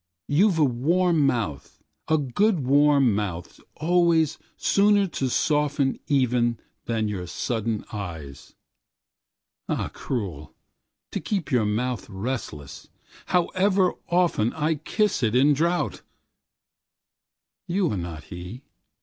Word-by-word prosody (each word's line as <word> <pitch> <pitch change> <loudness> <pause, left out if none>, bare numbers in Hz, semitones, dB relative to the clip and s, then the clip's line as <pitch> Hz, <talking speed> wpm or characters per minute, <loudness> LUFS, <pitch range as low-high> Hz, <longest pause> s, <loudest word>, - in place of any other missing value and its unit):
You've 180 +5 +3
a 155 - +4
warm 155 +5 +2
mouth,A 120 - -3
good 155 - +1
warm 140 -3 +4
mouth 95 -4 -4 0.2
always 165 -2 +2 0.2
sooner 205 0 +3
to 160 -7 -3
softenEven 135 -4 +1 0.3
than 110 -2 -1
your 95 -4 -4
sudden 110 +2 -2
eyes. 80 -9 -7 1.1
Ah - - -1
cruel, 95 - -5 0.6
to - - -2
keep 180 +2 -3
your 120 -5 +2
mouthRelentless, 110 - -4 0.4
however 185 +1 +2 0.2
oftenI 155 -2 +1
kiss 210 -3 0
it 115 -1 +1
in 140 +4 +5
drouth. 170 +5 0 1.7
You 185 0 +1
are - - -1
not 85 -5 -5
he. 90 - -9
135 Hz, 100 wpm, -25 LUFS, 110-165 Hz, 1.7 s, in